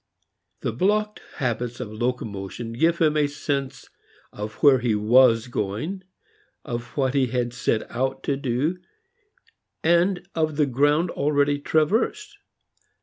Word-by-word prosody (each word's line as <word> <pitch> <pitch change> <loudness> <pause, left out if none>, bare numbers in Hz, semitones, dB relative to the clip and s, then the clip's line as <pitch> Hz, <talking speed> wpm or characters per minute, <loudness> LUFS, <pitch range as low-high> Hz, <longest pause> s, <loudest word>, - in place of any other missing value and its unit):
The - - -1
blocked 210 - 0
habits 120 -1 -2
of 110 -4 -6
locomotion 115 -1 -4
give 165 +7 +2
him 155 -2 +2
a 150 -1 +3
sense 140 -2 -4 0.5
of 105 +1 -6
where 140 -3 +7
he 120 -3 +1
was 115 +2 +5
going, 125 - -3 0.6
of 120 +2 -6
what 135 -2 +1
he 135 -2 +2
had 120 0 -2
set 110 -2 0
out 130 +2 -2
to 140 - 0
do, 140 +6 -1 1.0
and 175 +2 +2
of 155 -2 0
the 150 0 +3
ground 145 +6 +2
already 145 0 +1
traversed. 215 - 0
135 Hz, 130 wpm, -24 LUFS, 120-155 Hz, 1.0 s, where